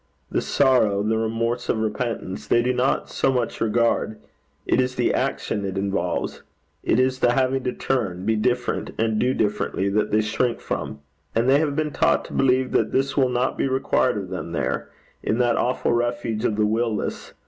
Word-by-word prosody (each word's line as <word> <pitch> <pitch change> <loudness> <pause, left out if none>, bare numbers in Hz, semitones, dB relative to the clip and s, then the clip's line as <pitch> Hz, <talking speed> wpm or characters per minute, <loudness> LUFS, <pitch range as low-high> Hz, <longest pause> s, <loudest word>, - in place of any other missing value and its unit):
The - - +1
sorrow, 110 -6 +3
the 110 +1 +1
remorse 115 +2 -1
of - - +2
repentance, 110 -2 -3
they 120 - +3
do 125 +1 +1
not 125 +2 +1
so 135 - +1
much 125 -3 -2
regard: 115 -1 +1 0.5
it 130 - +3
is 125 0 -2
the - - +1
action 105 - -1
it 95 0 -3
involves; 100 0 -2 0.4
it 115 - +2
is 130 0 +2
the 120 -1 +3
having 130 0 +1
to 125 - +1
turn, 95 -9 -2
be 110 +1 +2
different, 125 +3 -1
and 110 -1 +1
do 130 +1 +1
differently, 105 -2 0
that 105 +2 +1
they 110 - +3
shrink 115 +3 0
from; - - -4 0.3
and 115 +2 +2
they 135 +2 +5
have 150 -2 0
been 155 -1 -1
taught - - +2
to - - -10
believe 130 -1 +2
that - - +1
this 135 +1 0
will 130 -3 +3
not 125 +1 -1
be - - +2
required 130 0 +1
of - - -5
them - - -5
there - - -2 0.3
in 110 - 0
that 120 -1 +2
awful 125 -1 +1
refuge 120 -1 -1
of 105 - +1
the 105 0 +2
will 110 +1 +1
less. - - -5
120 Hz, 195 wpm, -23 LUFS, 110-130 Hz, 0.5 s, they